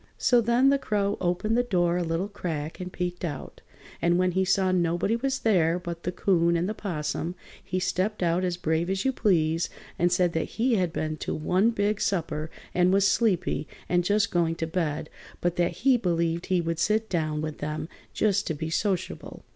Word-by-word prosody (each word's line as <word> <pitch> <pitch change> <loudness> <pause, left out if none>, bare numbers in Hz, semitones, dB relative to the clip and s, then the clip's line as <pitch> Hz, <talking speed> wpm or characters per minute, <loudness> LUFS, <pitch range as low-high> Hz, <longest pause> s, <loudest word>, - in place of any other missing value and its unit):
So 245 -1 +4
then 235 +4 +4
the 280 - +2
Crow 205 -4 0
opened 180 +5 0
the 245 - +4
door 175 -8 +1
a 180 - 0
little 165 +3 -1
crack 160 -6 -5
and 180 0 -5
peeked 180 0 -4
out, 145 -6 -5 0.4
and 175 +1 +3
when 185 0 +2
he 190 +2 +1
saw 190 0 +2
nobody 175 +4 +1
was 265 +3 -1
there 175 -8 +2
but 170 -1 -6
the 180 - -2
'Coon 170 -2 +2
and 170 +2 0
the 215 - -2
'Possum 170 -3 -3 0.3
he 185 - -2
stepped 185 +3 -1
out 170 +2 +1
as 180 -1 -1
brave 160 0 0
as 190 +3 -1
you 265 - +3
please 165 -8 +1 0.3
and 175 +1 +3
said 175 -1 +2
that 160 - -3
he 240 +2 +2
had 185 -6 +1
been 155 -1 -3
to - - -3
one 185 +8 +2
big 210 -2 0
supper 160 -4 -1 0.2
and 180 0 +3
was 195 +1 +4
sleepy 200 -8 +1 0.2
and 175 0 +2
just 205 +2 +2
going 170 -2 +1
to 165 - -2
bed, 160 -2 -2 0.3
but 175 -1 0
that 175 -1 +2
he 265 -2 +6
believed 170 -4 0
he 185 -2 +2
would 165 -1 -2
sit 215 +4 +1
down 155 -5 -1
with 155 0 -4
them 150 +1 -3 0.2
just 205 -2 +1
to 160 - -1
be 160 +2 -4
sociable. 190 +1 -2
180 Hz, 200 wpm, -27 LUFS, 165-200 Hz, 0.4 s, he